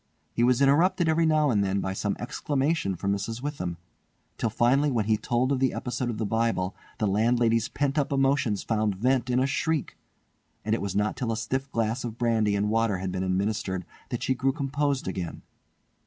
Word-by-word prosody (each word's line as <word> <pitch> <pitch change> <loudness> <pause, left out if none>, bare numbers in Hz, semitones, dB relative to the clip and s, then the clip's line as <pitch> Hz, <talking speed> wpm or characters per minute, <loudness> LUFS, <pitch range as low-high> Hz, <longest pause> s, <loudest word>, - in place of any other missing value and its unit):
He - - -1
was 125 +2 +4
interrupted 165 +5 +3
every 160 +1 +3
now 155 -3 +3
and 105 -3 +2
then 100 0 0
by 95 0 -2
some - - -1
exclamation 140 - -1
from 100 +3 -1
Mrs. 115 +5 -4
Witham, 90 - -3 0.6
till 115 - +1
finally 125 +6 +3
when 115 -6 0
he 110 0 +3
told 120 +4 0
of 135 - +1
the 130 -1 +2
episode 125 0 -2
of 115 - -3
the 110 - -1
Bible 110 -4 0 0.2
the 110 - 0
landlady's 115 +3 +2
pent 145 +1 0
up 145 - -1
emotions 135 -6 +1
found 110 -3 0
vent 125 +4 +1
in 125 0 +2
a 130 - +3
shriek; 150 +2 -1 0.7
and 110 - +1
it 115 - 0
was 100 -2 -3
not 105 +1 +1
till 125 -4 -2
a 110 - -1
stiff 135 +4 -3
glass 115 +2 -1
of 115 -2 -5
brandy 115 -4 +2
and 105 +1 0
water 115 -3 +2
had 95 0 -3
been 95 0 -3
administered 95 -1 -1 0.2
that - - -3
she 130 - +2
grew 135 +1 0
composed 140 - -1
again. 90 -2 -4
115 Hz, 200 wpm, -27 LUFS, 105-135 Hz, 0.7 s, was